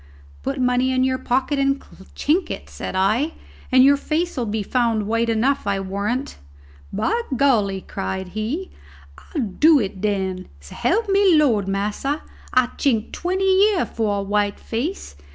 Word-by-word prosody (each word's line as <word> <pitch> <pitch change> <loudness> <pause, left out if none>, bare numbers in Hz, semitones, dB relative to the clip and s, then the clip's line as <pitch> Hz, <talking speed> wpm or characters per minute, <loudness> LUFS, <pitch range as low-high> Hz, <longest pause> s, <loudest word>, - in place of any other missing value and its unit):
"Put - - -3
money 250 +1 +2
in 255 0 +2
your 260 0 +1
pocket 265 +3 0
and 275 0 +2 0.4
chink 330 +4 +1
it," - - -6
said - - -6
I, 220 +12 +1 0.4
"and 255 0 +7
your 280 +1 +6
face'll 310 -3 -1
be 210 0 -2
found 230 -2 0
white 230 +2 0
enough, 235 +2 +1
I 200 -1 +1
warrant." 200 +7 -3 0.5
"By 460 +7 0 0.2
golly!" 210 -8 +2
cried 190 -1 -5
he, 230 - -4 0.6
"I'll 295 - +1
do 290 - +4
it 195 -4 -4
den. 190 -3 -1
S'elp 375 - -1
me 390 -4 +4
de 300 - +5
Lord, 210 -7 +1
massa, 210 +9 -2 0.3
I'd 255 -1 +1
chink 230 -6 +1
twenty 370 +2 -1 0.2
year 395 -4 +1
for 215 -3 -1
a 200 - -2
white 205 0 0
face. 240 - -4
245 Hz, 155 wpm, -22 LUFS, 205-285 Hz, 0.6 s, and